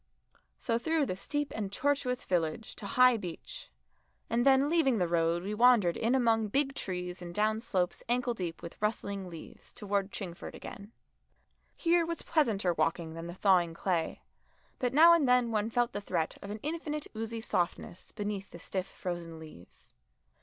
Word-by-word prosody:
So 230 -1 -1
through 320 +2 +1
the 185 - -3
steep 290 +8 -3
and 205 -3 -3
tortuous 275 0 0
village 175 +4 -1
to 200 - -6
High 250 +2 +5
Beech, 180 -5 -8 0.6
and 235 +1 +2
then 270 +1 +5
leaving 300 -7 +3
the 180 -3 +1
road 170 0 +1
we 205 +2 -3
wandered 225 -6 +5
in 235 +4 +1
among 225 -4 +3
big 275 +5 +1
trees 180 -5 -4
and 175 -1 -8
down 215 +1 +2
slopes 185 -5 -1
ankle 245 0 +1
deep 175 -6 -5
with 170 - -9
rustling 200 -3 -2
leaves 165 -2 -11
towards 200 -3 -2
Chingford 180 -5 -7
again. 200 +2 -9 0.8
Here 340 0 +3
was 335 0 -4
pleasanter 220 - +1
walking 165 -1 -1
than 165 +1 -6
the 175 - -7
thawing 180 -4 +3
clay, 170 -2 -1 0.6
but 250 -1 0
now 325 +5 +8
and 305 -6 +3
then 250 -2 +4
one 215 0 0
felt 240 +1 +1
the 205 - -3
threat 160 -5 -1
of 200 - -8
an 210 +1 -5
infinite 300 -1 -3
oozy 225 +1 -4
softness 180 -3 -3
beneath 205 -2 -4
the - - -10
stiff 185 +2 -4
frozen 175 -3 -6
leaves. 155 - -12
210 Hz, 170 wpm, -31 LUFS, 180-250 Hz, 0.8 s, now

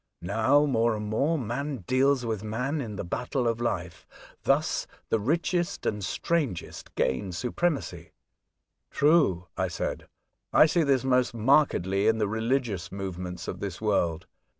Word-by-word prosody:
Now, 110 +10 +3
more 115 -4 +2
and 105 0 -4
more, 140 +10 +1
man 130 -1 -3
deals 130 +1 +2
with 110 -3 -2
man 125 +8 -2
in 110 -5 -5
the - - -4
battle 125 +6 -2
of 115 0 -1
life; 90 -7 -3 0.3
thus - - +1 0.2
the 110 - +2
richest 170 - -1
and 105 -1 -1
strongest 140 - -2
gain 90 +9 0
supremacy.'' 140 - -2 0.4
" - - -54 0.3
True," 145 - +3
I 95 0 0
said. 85 - -4 0.2
" - - -51
I - - +8
see 170 +2 +2
this 140 -4 +2
most 130 -2 +2
markedly 110 - +3
in 110 0 +4
the 105 -2 +1
religious 110 -3 -1
movements 90 -2 -5
of - - -5
this 100 -4 -5
world. 90 -6 0
115 Hz, 150 wpm, -27 LUFS, 100-140 Hz, 0.4 s, I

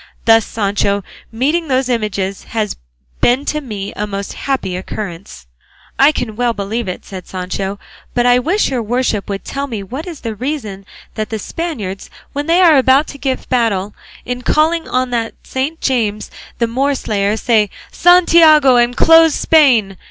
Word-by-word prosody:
Thus, 225 -1 +5
Sancho, 200 -1 -1 0.3
meeting 295 +9 0
those 260 -1 +1
images 200 -5 -2
has 215 -2 -3 0.5
been 255 +4 +2
to 300 - -2
me 210 -7 -6
a 210 - -3
most 200 0 -5
happy 265 -9 -3
occurrence." 180 - -7 0.5
"I 275 +3 +6
can 240 -7 -4
well 240 0 0
believe 220 +2 -3
it," 180 - -6
said 185 -2 -9
Sancho; 190 +2 -4 0.4
"but 240 0 +2
I 245 0 +5
wish 345 +7 0
your 250 -3 -1
worship 225 -2 -1
would 195 -1 -4
tell 280 +1 -4
me 220 -6 -5
what 265 - -7
is 335 -5 -8
the 225 -2 -4
reason 215 -5 -5 0.3
that 215 -1 -4
the 220 - -3
Spaniards, 215 - -5 0.2
when 290 +1 -3
they 340 +2 +4
are 325 -6 +6
about 265 +3 +4
to 280 - -10
give 265 -2 -3
battle, 210 -5 0 0.3
in 250 0 -4
calling 320 +5 +1
on 255 0 -1
that 230 -2 -2
Saint 275 +5 -3
James 220 -5 -1 0.3
the 235 - +1
Moorslayer, 230 -5 -1
say 220 -3 +2 0.2
'Santiago 325 -6 +6
and 240 0 +2
close 325 -1 +6
Spain! 240 - +3
240 Hz, 165 wpm, -16 LUFS, 205-280 Hz, 0.5 s, I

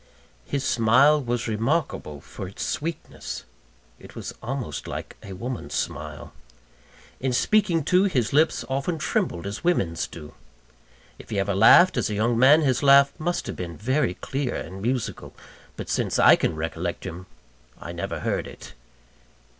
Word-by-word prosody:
His 140 -2 -2
smile 130 +6 +4
was 120 -2 -2
remarkable 110 - -2
for 95 - -8
its 95 - -6
sweetness 165 +2 -5 0.6
it - - -14
was - - -6
almost 120 - -5
like - - -6
a 95 - -9
woman's 120 +6 -5
smile. 75 -2 -5 0.9
In 130 0 -1
speaking, 170 - +2
too, 180 +6 +3
his 130 - 0
lips 155 +3 +2
often 135 +6 -2
trembled 160 - -1
as 100 +8 -5
women's 95 - 0
do. 75 -2 -11 0.9
If - - -13
he 105 - -3
ever 100 +1 0
laughed, 175 - +6
as 125 - 0
a 105 - -2
young 115 +3 +1
man, 140 +5 +7
his 130 -5 +1
laugh 140 0 +6
must 175 +3 -2
have - - -5
been 85 -2 -6
very 130 -3 0
clear 135 -2 -3
and 95 +4 -6
musical; 120 +1 -3 0.4
but - - -6
since - - -1
I - - +7
can 80 - -1
recollect 80 +2 -4
him, 90 0 -7 0.5
I - - -7
never - - -5
heard - - -2
it. - - -12
125 Hz, 155 wpm, -24 LUFS, 95-145 Hz, 0.9 s, man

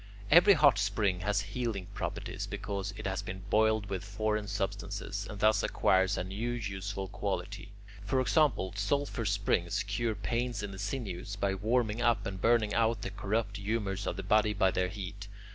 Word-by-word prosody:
Every 175 +6 +8
hot 145 - +5
spring 100 -1 +1
has 105 +2 0
healing 105 -1 -3
properties - - -4
because 100 0 -4
it - - -7
has 95 +1 -1
been 95 -1 -7
boiled 110 -1 +3
with 95 -2 -4
foreign 105 +1 -1
substances, 100 0 -3
and 105 - -7
thus 110 +2 +4
acquires 95 +2 +2
a - - -1
new 105 +6 -3
useful 100 -3 -4
quality. 105 +1 -4 0.3
For 100 +6 +1
example, 130 -8 +2
sulphur 120 +3 -1
springs 100 -1 +1
cure 110 +2 -1
pains 120 +1 -2
in 100 - -4
the 95 - -8
sinews, 100 -3 -4
by 100 -1 0
warming 110 +2 0
up 120 -1 +2
and 95 -1 -5
burning 115 -3 +3
out 115 0 +1
the 95 - -3
corrupt 100 +1 -2
humours 100 -1 -2
of 90 - -2
the 95 - -4
body 105 +2 +3
by 95 -1 +3
their 90 0 +1
heat. 100 +1 -7
100 Hz, 175 wpm, -31 LUFS, 95-110 Hz, 0.3 s, Every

